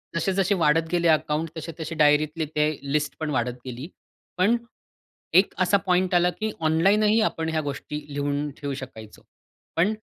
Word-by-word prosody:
जसे-जसे 195 +3 +1
वाढत 165 -1 +2
गेले 170 -1 +2
अकाउंट 155 0 +1
तसे-तसे 160 0 -6
डायरीतली 155 +1 +3
ते 150 0 +3 0.2
लिस्ट 150 -1 0
पण 155 -1 -2
वाढत 125 -2 0
गेली. 130 +3 -6 0.5
पण 205 +6 +3 0.8
एक 190 +2 +5
असा 185 +2 +4
पॉइंट 185 0 +2
आला 175 0 +4
की 220 0 -1
ऑनलाईन 165 +7 +3
ही 215 +1 +4
आपण 160 0 -3
ह्या 160 -1 0
गोष्टी 145 +1 -5
लिहून 145 +1 -1
ठेवू 145 -2 -4
शकायचो. 115 -5 -9 0.5
पण 180 +6 +2
160 Hz, 155 wpm, -25 LUFS, 150-180 Hz, 0.8 s, एक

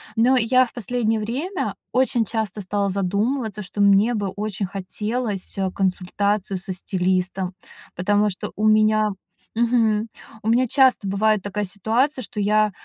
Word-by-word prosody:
Но 245 +3 +4
я 255 +2 +4
в 240 - -14
последнее 225 -1 -1
время 275 - -3 0.2
очень 250 -3 +2
часто 220 -2 -3
стала 200 +1 -1
задумываться, 210 +4 -1
что 205 +1 -4
мне 200 +4 +5
бы 205 -3 -1
очень 205 +1 -3
хотелось, 205 +2 -4
а, 190 -1 0
консультацию 195 +1 -1
со 185 +1 -6
стилистом, 185 0 -1 0.4
потому 205 +3 +2
что 190 - -6
у 215 +1 +1
меня 215 0 +4 0.5
мгм, 230 -2 +2 0.4
у 220 - 0
меня 250 +2 +3
часто 260 -5 +3
бывает 210 +1 +2
такая 205 +1 -3
ситуация, 225 +9 0
что 210 -2 -7
я, 210 +1 +3
210 Hz, 145 wpm, -22 LUFS, 195-230 Hz, 0.5 s, мне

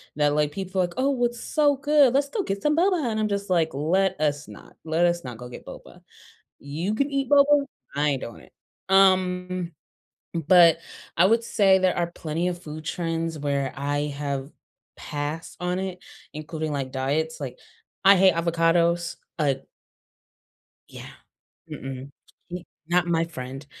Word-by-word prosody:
that, 145 -1 +2
like, 150 -1 +1
people 190 +1 -2
are - - +3
like, 175 - -8
"Oh, 260 -2 +1
it's 240 0 -3
so 290 -2 +2
good. 290 -3 +4
Let's 280 0 +2
go 415 -4 -2
get 195 0 -3
some 300 0 +2
boba," 345 -7 +2
and 215 - -2
I'm 215 - +1
just 200 -1 -3
like, 165 -4 +2
"Let 180 +5 +1
us 145 0 0
not, - - -14
let 160 +2 +2
us 170 0 +1
not 125 -3 -7
go 125 +1 -9
get - - -10
boba. - - -12 0.6
You 165 +9 -3
can 280 +4 0
eat 275 -2 -1
boba, 285 0 +5 0.3
I 145 +1 +2
ain't 135 - -2
doing 115 - -8
it." - - -19 0.4
Um, 185 -2 +3 0.6
but, 170 0 +6 0.4
I 175 +3 +6
would 230 +2 +2
say 195 -4 +4
there 185 -1 +1
are 170 -1 -1
plenty 165 +3 -2
of 175 0 -5
food 155 +1 -8
trends 165 -2 -2
where 140 -2 -1
I 145 +1 -1 0.2
have 140 -1 -3 0.5
passed 150 +2 -5
on 180 +1 -1
it, 190 -1 -4 0.3
including, 155 0 -4
like, 135 -2 -3
diets. 150 +4 -1
Like, 130 -3 -6 0.5
I 195 0 +8
hate 190 -2 +5
avocados, 170 0 +1 0.2
uh 145 -3 +2 1.3
Yeah. - - -10 0.6
Mm-mm, 135 +1 -7 0.4
M - - -2 0.3
not 175 0 +2
my 165 -1 +1
friend. 135 -3 -8
170 Hz, 165 wpm, -25 LUFS, 150-195 Hz, 1.3 s, I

